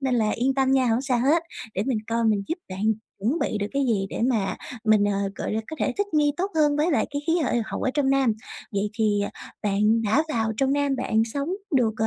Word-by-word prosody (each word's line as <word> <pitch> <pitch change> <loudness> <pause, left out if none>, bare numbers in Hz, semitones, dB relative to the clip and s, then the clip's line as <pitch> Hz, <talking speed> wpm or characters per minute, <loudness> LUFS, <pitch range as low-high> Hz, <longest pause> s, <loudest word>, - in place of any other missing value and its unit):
nên 265 -2 0
là 220 -3 +2
yên 260 +4 +1
tâm 265 -1 +2
nha, 265 -1 +3
hổng 235 +2 +2
sao 260 -3 +1
hết! 300 +7 +3 0.3
Để 195 - 0
mình 255 -5 +1
coi 230 0 0
mình 210 -3 +2
giúp 330 +3 -2
bạn 190 +1 -5 0.4
chuẩn 235 - 0
bị 215 - -1
được 205 - -1
cái 280 0 +1
gì 205 -5 +1
để - - -4
mà 215 -6 0 0.3
mình, 215 -2 +4
ờ, 205 - +1 0.2
gọi - - -4
là, 220 - 0
có 315 - -7
thể - - 0
thích 405 - +1
nghi 295 -1 +3
tốt 380 +3 -1
hơn 295 -2 +3
với 305 +4 +2
lại 290 - +2
cái 285 0 -3
khí 325 - +2
hệ 245 - +1
hậu - - -5
ở 260 - +1
trong 285 -3 +2
Nam. 270 -4 +3 0.4
Vậy 200 +1 -1
thì 210 -2 +2 0.4
bạn 210 +2 +2
đã 225 +8 +3
vào 225 -5 0
trong 270 +2 +2
Nam 285 -1 +1
bạn 225 -3 +1
sống 280 +6 -3 0.3
được, 225 -4 +2
ờ, 220 -2 +1
245 Hz, 255 wpm, -25 LUFS, 215-280 Hz, 0.4 s, mình